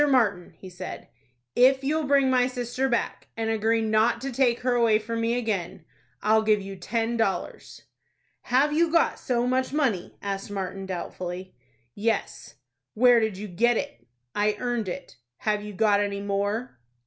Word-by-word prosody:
Martin," 200 Hz, -10 st, +1 dB
he 190 Hz, -, -11 dB
said, 180 Hz, 0 st, -8 dB, 0.5 s
"if 265 Hz, +2 st, +5 dB
you'll 305 Hz, +3 st, 0 dB
bring 275 Hz, -1 st, +4 dB
my 250 Hz, -1 st, +3 dB
sister 250 Hz, +1 st, -2 dB
back, 235 Hz, -, -2 dB
and 225 Hz, 0 st, -1 dB
agree 225 Hz, +1 st, +1 dB
not 220 Hz, +2 st, +2 dB
to 270 Hz, +2 st, -4 dB
take 245 Hz, -1 st, +2 dB
her 250 Hz, 0 st, +1 dB
away 230 Hz, -3 st, +4 dB
from 230 Hz, +1 st, -4 dB
me 230 Hz, +1 st, +1 dB
again, 210 Hz, -8 st, -3 dB, 0.4 s
I'll 220 Hz, +1 st, +4 dB
give 215 Hz, -1 st, +3 dB
you 195 Hz, 0 st, -7 dB
ten 225 Hz, +5 st, -2 dB
dollars." 210 Hz, -4 st, -3 dB, 0.6 s
"Have 275 Hz, +4 st, +3 dB
you 330 Hz, +1 st, +2 dB
got 335 Hz, 0 st, +2 dB
so 245 Hz, -1 st, 0 dB
much 255 Hz, +1 st, 0 dB
money?" 260 Hz, -, -1 dB
asked 195 Hz, 0 st, -4 dB
Martin, 195 Hz, -1 st, -4 dB
doubtfully. 185 Hz, 0 st, -5 dB, 0.4 s
"Yes." 220 Hz, +1 st, -2 dB, 0.4 s
"Where 245 Hz, +1 st, +6 dB
did 220 Hz, -4 st, -1 dB
you 210 Hz, +2 st, -6 dB
get 230 Hz, +6 st, +2 dB
it?" 120 Hz, +1 st, -6 dB, 0.3 s
"I 210 Hz, 0 st, +1 dB
earned 240 Hz, -5 st, -1 dB
it." 180 Hz, -6 st, -7 dB, 0.2 s
"Have 210 Hz, -1 st, 0 dB
you 210 Hz, 0 st, -7 dB
got 205 Hz, +1 st, +3 dB
any 200 Hz, -1 st, -1 dB
more?" 200 Hz, -, -2 dB
225 Hz, 165 wpm, -26 LUFS, 200-245 Hz, 0.6 s, Where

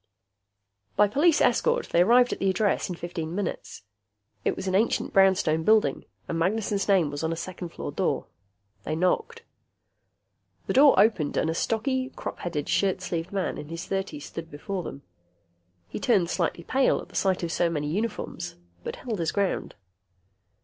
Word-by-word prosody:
By 210 Hz, -, +5 dB
police 295 Hz, -, +3 dB
escort, 485 Hz, 0 st, +2 dB
they 170 Hz, -, +3 dB
arrived 245 Hz, +6 st, +5 dB
at -, -, -7 dB
the 195 Hz, -, +2 dB
address 200 Hz, 0 st, +1 dB
in 180 Hz, -, -3 dB
fifteen 170 Hz, -1 st, -5 dB
minutes. 200 Hz, -, -4 dB, 0.6 s
It -, -, +1 dB
was 190 Hz, -, -5 dB
an 185 Hz, -, 0 dB
ancient 210 Hz, +5 st, +1 dB
brownstone 185 Hz, -5 st, +4 dB, 0.6 s
and 165 Hz, -, -2 dB
Magnessen's 200 Hz, +2 st, 0 dB
name 185 Hz, -7 st, +3 dB
was 145 Hz, +2 st, -5 dB
on 160 Hz, -, 0 dB
a -, -, -1 dB
second 175 Hz, +1 st, -6 dB
floor -, -, -6 dB
door. -, -, -1 dB, 0.6 s
They 155 Hz, -, -2 dB
knocked. 185 Hz, -, 0 dB, 1.2 s
The -, -, -1 dB
door 275 Hz, +1 st, +6 dB
opened 195 Hz, -9 st, +3 dB
and 160 Hz, -, +1 dB
a -, -, -1 dB
stocky, 260 Hz, +8 st, -1 dB
crop -, -, -6 dB
headed, 155 Hz, -5 st, -3 dB
shirt 190 Hz, -2 st, +1 dB
sleeved 170 Hz, -1 st, -3 dB
man 195 Hz, -2 st, -2 dB
in 150 Hz, -, -8 dB
his 165 Hz, +1 st, -5 dB
thirties 190 Hz, -7 st, -3 dB
stood 165 Hz, -1 st, -7 dB
before 180 Hz, +6 st, -4 dB
them. 140 Hz, -4 st, -8 dB, 0.8 s
He -, -, -6 dB
turned 195 Hz, -8 st, +2 dB
slightly 170 Hz, -1 st, -1 dB
pale 265 Hz, +8 st, +2 dB
at -, -, -10 dB
the -, -, -16 dB
sight 190 Hz, -2 st, +1 dB
of 170 Hz, -, -2 dB
so 170 Hz, -, +1 dB
many 150 Hz, -3 st, -2 dB
uniforms, 180 Hz, -1 st, -3 dB, 0.3 s
but -, -, -4 dB
held 230 Hz, -6 st, -5 dB
his 165 Hz, -1 st, 0 dB
ground. 200 Hz, -2 st, -1 dB
185 Hz, 170 wpm, -26 LUFS, 165-215 Hz, 1.2 s, door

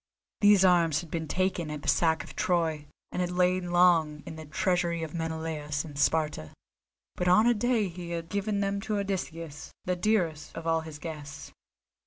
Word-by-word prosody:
These 205 Hz, -3 st, +6 dB
arms 165 Hz, -4 st, +4 dB
had 170 Hz, -, -12 dB
been 160 Hz, -2 st, -3 dB
taken 185 Hz, -2 st, -1 dB
at 150 Hz, -1 st, -6 dB
the -, -, -7 dB
sack 160 Hz, -1 st, +3 dB
of -, -, -12 dB
Troy, 160 Hz, -4 st, 0 dB, 0.2 s
and 180 Hz, -, -2 dB
had 180 Hz, -, 0 dB
lain 180 Hz, 0 st, +1 dB
long 170 Hz, -4 st, +3 dB
in -, -, -7 dB
the 160 Hz, 0 st, -9 dB
treasury 170 Hz, +2 st, 0 dB
of 155 Hz, -, -6 dB
Menelaus 160 Hz, -2 st, -3 dB
in 150 Hz, -2 st, -10 dB
Sparta; 150 Hz, -, 0 dB, 0.6 s
but 180 Hz, -, -2 dB
on 185 Hz, +5 st, +6 dB
a 240 Hz, -, +5 dB
day 235 Hz, -2 st, +1 dB
he 175 Hz, -1 st, -8 dB
had 170 Hz, -1 st, -4 dB
given 205 Hz, +2 st, -1 dB
them 200 Hz, 0 st, -1 dB
to 210 Hz, +1 st, -2 dB
Odysseus, 165 Hz, -6 st, -4 dB
the 180 Hz, -, 0 dB
dearest 175 Hz, -6 st, 0 dB
of 165 Hz, -, -6 dB
all 165 Hz, 0 st, +2 dB
his 160 Hz, -2 st, -9 dB
guests. 145 Hz, -3 st, -8 dB
170 Hz, 185 wpm, -28 LUFS, 160-185 Hz, 0.6 s, These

